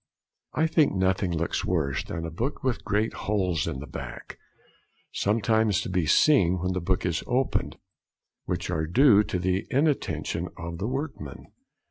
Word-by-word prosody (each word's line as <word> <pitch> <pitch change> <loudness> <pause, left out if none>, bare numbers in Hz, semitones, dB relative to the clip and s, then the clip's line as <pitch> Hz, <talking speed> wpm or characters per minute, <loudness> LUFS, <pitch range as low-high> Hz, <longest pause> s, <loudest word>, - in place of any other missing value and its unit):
] - - -52
I 160 - +2
think 155 - +3
nothing 95 0 +1
looks 85 0 -1
worse 70 -7 0
than 80 0 -5
a 80 - -5
book 120 - -3
with 130 -2 -1
great 105 +2 0
holes 90 -8 -1
in - - -3
the 75 - -7
back, 60 -4 -8 0.7
sometimes 110 0 +2
to - - -5
be 90 -4 0
seen 95 - +4
when 90 +1 -1
the 90 - -2
book 95 +2 0
is 85 -3 -1
opened, 125 +2 0 0.7
which - - -3
are 80 0 -1
due 115 - +6
to 90 - -3
the 90 +1 -1
inattention 145 +2 0
of 85 0 -6
the 100 - -2
workmen. 130 - -5
95 Hz, 165 wpm, -26 LUFS, 85-115 Hz, 0.7 s, due